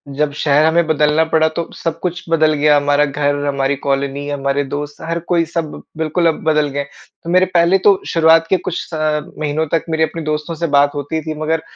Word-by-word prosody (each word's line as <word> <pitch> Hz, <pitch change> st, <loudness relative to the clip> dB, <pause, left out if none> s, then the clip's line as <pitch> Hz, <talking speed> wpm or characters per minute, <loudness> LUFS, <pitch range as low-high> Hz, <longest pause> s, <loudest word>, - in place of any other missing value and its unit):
जब 150 Hz, 0 st, 0 dB
शहर 150 Hz, +1 st, +3 dB
हमें 165 Hz, +1 st, +3 dB
बदलना 150 Hz, +1 st, +2 dB
पड़ा 160 Hz, 0 st, +2 dB
तो 165 Hz, +1 st, -5 dB
सब 165 Hz, -1 st, -4 dB
कुछ 175 Hz, -1 st, -4 dB
बदल 155 Hz, -1 st, +3 dB
गया 150 Hz, 0 st, +3 dB
हमारा 145 Hz, +1 st, +2 dB
घर, 145 Hz, 0 st, -1 dB
हमारी 140 Hz, 0 st, 0 dB
कॉलोनी, 140 Hz, +1 st, -1 dB
हमारे 140 Hz, 0 st, -1 dB
दोस्त 145 Hz, 0 st, -5 dB
हर 165 Hz, +1 st, -3 dB
कोई 170 Hz, 0 st, 0 dB
सब 165 Hz, -2 st, -5 dB, 0.2 s
बिल्कुल 160 Hz, +2 st, 0 dB
अब 160 Hz, -, -1 dB
बदल 150 Hz, -1 st, +2 dB
गए। 140 Hz, -, -1 dB, 0.4 s
तो 170 Hz, -, -7 dB
मेरे 185 Hz, +1 st, +4 dB
पहले 170 Hz, +2 st, +4 dB
तो 195 Hz, -2 st, +5 dB
शुरुआत 165 Hz, 0 st, +4 dB
के 190 Hz, -, +3 dB
कुछ 175 Hz, -1 st, -4 dB
अ, 155 Hz, -1 st, 0 dB, 0.2 s
महीनों 155 Hz, +1 st, -1 dB
तक 165 Hz, -, 0 dB
मेरे 160 Hz, 0 st, +1 dB
अपने 160 Hz, +1 st, -3 dB
दोस्तों 155 Hz, +2 st, -3 dB
से 170 Hz, +1 st, -2 dB
बात 145 Hz, 0 st, +3 dB
होती 145 Hz, +3 st, -3 dB
थी 155 Hz, 0 st, -5 dB
मगर 160 Hz, +1 st, 0 dB
155 Hz, 210 wpm, -17 LUFS, 145-165 Hz, 0.4 s, तो